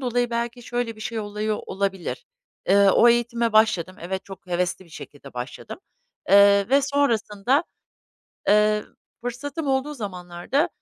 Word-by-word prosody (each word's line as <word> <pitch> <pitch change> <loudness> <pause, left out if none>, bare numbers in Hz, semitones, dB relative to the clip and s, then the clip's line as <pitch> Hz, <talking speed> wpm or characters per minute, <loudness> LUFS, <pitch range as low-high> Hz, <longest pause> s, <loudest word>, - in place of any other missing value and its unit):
dolayı 245 -1 0
belki 235 +1 -3
şöyle 240 -2 -3
bir - - -14
şey 225 +1 -4
oluyor 210 0 -2
olabilir. 195 - -3 0.4
Eee, 200 0 +6
o 240 - +6
eğitime 235 -1 +1
başladım. 185 -5 +2
Evet, 190 +2 -4
çok 195 -1 -12
hevesli 180 +1 -2
bir 170 - -21
şekilde 145 -2 -12
başladım. 125 - -7 0.5
Eee, 200 +1 +6
ve 275 +1 +4
sonrasında, 265 - +1 0.8
eee, 210 0 +4 0.4
fırsatım 275 +5 -5
olduğu 270 +2 0
zamanlarda 195 - -2
215 Hz, 135 wpm, -24 LUFS, 195-245 Hz, 0.8 s, Eee